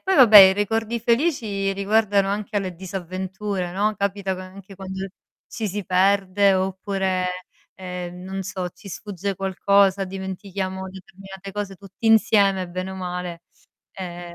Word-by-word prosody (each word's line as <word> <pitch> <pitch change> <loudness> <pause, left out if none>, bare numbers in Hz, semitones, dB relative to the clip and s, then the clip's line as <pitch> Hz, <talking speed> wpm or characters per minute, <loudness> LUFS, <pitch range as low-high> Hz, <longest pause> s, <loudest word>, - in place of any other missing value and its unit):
poi 380 0 +2
vabbè, 235 -6 +9
i 190 -1 +10
ricordi 225 +3 -1
felici 230 -6 +1
riguardano 200 0 +2
anche 205 +1 -2
le 185 -2 -5
disavventure, 185 +1 -4
no, 210 +3 +1
capitano 195 -1 -2
anche 195 +1 -12
quando 190 0 -5 0.4
ci 225 - -4
si 200 +1 -4
perde, 195 +1 +3
oppure, 190 0 -1 0.5
ehm, 180 -1 -7
non 190 +1 -5
so 185 -1 -4
ci 200 - -14
sfugge 200 0 -4
qualcosa, 195 +1 +2
dimentichiamo 190 0 -5
determinate 195 +1 -11
cose 205 -1 -4
tutti 195 +4 -8
insieme 200 -4 +4
bene 185 +2 -4
o - - -7
male, 180 -2 -5 0.5
ehm, 175 -2 -7
195 Hz, 135 wpm, -23 LUFS, 185-200 Hz, 0.5 s, i